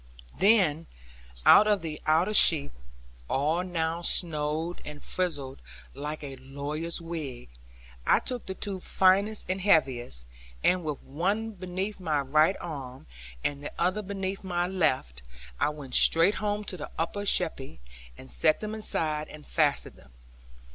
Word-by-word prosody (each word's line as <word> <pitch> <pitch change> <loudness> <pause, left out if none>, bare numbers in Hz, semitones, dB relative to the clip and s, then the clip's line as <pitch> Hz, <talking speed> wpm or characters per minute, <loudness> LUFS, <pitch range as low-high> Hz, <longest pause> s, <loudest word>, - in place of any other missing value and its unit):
Then 180 -6 +3 0.6
of 210 -3 +6
the 155 -2 -5
outer 165 +7 +3
sheep 155 -8 +6 0.6
(all 155 +6 +1
now 165 -2 -2
snowed 160 0 0
and 150 -1 -9
frizzled 145 -7 -3 0.3
like 150 +2 -6
a 135 -2 -7
lawyer's 145 +5 -5
wig) 155 -7 -6 0.6
I - - +6
took 250 -2 -4
the 190 - -4
two 195 -1 -4
finest 195 +4 +2
and 185 +1 -2
heaviest, 130 - +1 0.4
and 180 -1 +3
with 150 -3 -4
one 200 +10 -1
beneath 190 +1 -4
my 155 -5 0
right 155 +6 +3
arm, 135 -5 -7 0.4
and 145 0 -2
the - - -5
other 185 +5 +1
beneath 195 0 -4
my 175 -2 -1
left, 150 - 0 0.4
I - - +2
went 145 -4 -9
straight 165 +5 +6
home 210 0 -1
to 190 -2 -6
the 150 - -7
upper 170 +5 -2
sheppey, 160 - -1 0.4
and 65 - -12
set 60 - +2
them 215 0 -5
inside 155 -8 -1
and 150 -1 -12
fastened 150 -3 0
them. 65 -2 -20
165 Hz, 140 wpm, -28 LUFS, 145-190 Hz, 0.6 s, of